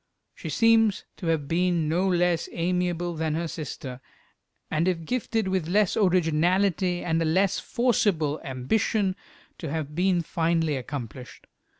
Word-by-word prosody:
She - - -7
seems 225 -3 +3
to 175 - -5
have 160 -3 0
been 170 -1 +1
no 175 +5 +1
less 175 -2 +1
amiable 175 0 -1
than 160 -1 -1
her 170 +1 -2
sister, 135 -4 -7 0.7
and 160 +3 +1
if 170 -3 -1
gifted 225 -1 -1
with 190 -4 -1
less 200 +2 +2
originality 180 0 +2
and 165 -1 0
a - - +1
less 185 +4 +2
forcible 195 - +1
ambition, 190 - 0 0.4
to 160 - -5
have 150 -1 -3
been 180 +1 +1
finely 165 -2 0
accomplished. 130 -2 -7
170 Hz, 135 wpm, -26 LUFS, 155-190 Hz, 0.7 s, seems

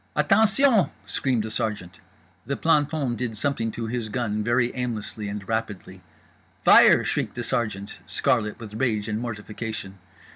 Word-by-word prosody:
"Attention!" 210 - +4 0.2
screamed 125 -5 0
the 110 - -5
sergeant. 100 -5 -3 0.5
The 140 - -2
planton 150 -5 +1
did 115 -2 -4
something 115 -2 -1
to 115 - -4
his 115 -1 -3
gun 105 -1 -2
very 120 +2 +1
aimlessly 110 -4 -4
and 100 -1 -6
rapidly. 110 -3 -4 0.6
"FIRE!" - - +7
shrieked - - -2
the - - -3
sergeant, 100 -4 -3
scarlet 115 -6 0
with 110 -3 -9
rage 110 -3 0
and 110 0 -2
mortification. 105 -3 -6
115 Hz, 140 wpm, -25 LUFS, 105-130 Hz, 0.6 s, FIRE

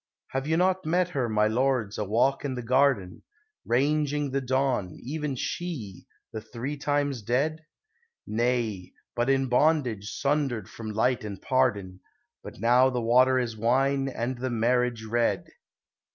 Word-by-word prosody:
Have 135 +2 -3
you 160 +1 +2
not 185 +1 +2
met 175 +3 +1
her, 135 -9 -1
my 105 0 +2
lords, 120 -3 0
a - - 0
walk 120 +8 +1
in 135 -2 -2
the 125 - -5
garden, 130 -6 +1 0.4
Ranging 145 +2 +1
the 140 +1 0
dawn, 130 -7 -1
even 150 +1 -3
she, 125 - -5 0.3
the 110 - -4
three 120 +6 -5
times 145 -3 -1
dead? 150 +8 -1 0.6
Nay! 115 -4 -1 0.2
But 120 +2 0
in 135 -1 +2
bondage, 125 -6 +1
sundered 135 -8 0
from 110 -1 -8
light 110 +3 +1
and 100 -3 -6
pardon 105 -9 0 0.4
But - - -11
now 125 +4 +4
the 125 -1 -2
water 125 +3 +4
is 120 -3 -1
wine, 135 +5 +1
and 125 0 -3
the 130 +1 -2
marriage 120 0 +1
read. 120 +2 0
125 Hz, 150 wpm, -27 LUFS, 115-140 Hz, 0.6 s, now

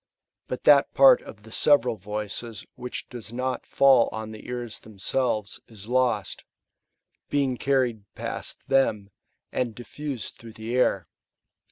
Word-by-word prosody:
But - - -5
that - - +6
part - - +8
of - - -12
the - - -14
several 125 -5 +4
voices 105 +2 -5
which 125 -1 -6
does 120 -3 -8
not 130 +1 -3
fall 135 -4 +5
on 110 0 -5
the 110 - -10
ears 120 -2 -4
them 110 -2 -15
selves, 110 -1 -1
is 105 -2 -11
lost, 125 -5 0 0.9
being 140 -3 +1
carried 125 -6 0
past - - -5
them, 110 -7 +2 0.4
and 120 -3 -2
difiused 135 +1 -6
through 115 -2 -12
the 110 +2 -5
air. 100 -8 +2
120 Hz, 140 wpm, -26 LUFS, 110-130 Hz, 0.9 s, part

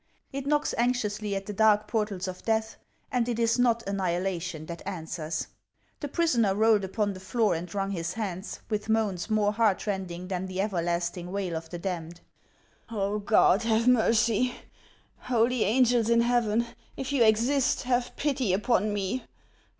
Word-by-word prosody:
It 275 0 -4
knocks 295 0 +1
anxiously 215 -4 0
at 195 0 -4
the 210 - -5
dark 210 0 +3
portals 210 -5 -2
of 185 -1 -6
death; 220 0 0 0.4
and 245 -1 +1
it 235 - -1
is 230 +1 +2
not 235 -3 +2
annihilation 180 -3 -2
that 170 +1 -7
answers. 160 -3 -4 0.5
The 290 - -4
prisoner 255 - +2
rolled 215 -1 +4
upon 205 +2 -1
the 185 - -9
floor 215 +3 +1
and 170 +2 -5
wrung 195 -1 -2
his 170 -2 -3
hands, 195 -3 -5
with 210 0 -3
moans 215 -4 0
more 210 -1 +2
heart 215 -3 +2
rending 185 -3 -4
than 185 0 -3
the 185 0 -5
everlasting 175 -2 -1
wail 190 -4 -2
of 160 0 -6
the 175 - -5
damned. 175 -2 -5 0.4
" - - -35 0.4
God 215 -1 +5
have 230 +1 +1
mercy 235 0 +3 0.7
I - - -19
Holy 240 -1 +2
angels 235 0 +3
in 235 0 +4
heaven, 235 -1 +2 0.3
if 265 +1 -4
you 260 -4 +4
exist, 240 +7 +2
have 245 -1 0
pity 265 -9 0
upon 215 +1 +1
me 200 +6 -2
210 Hz, 165 wpm, -27 LUFS, 185-235 Hz, 0.7 s, God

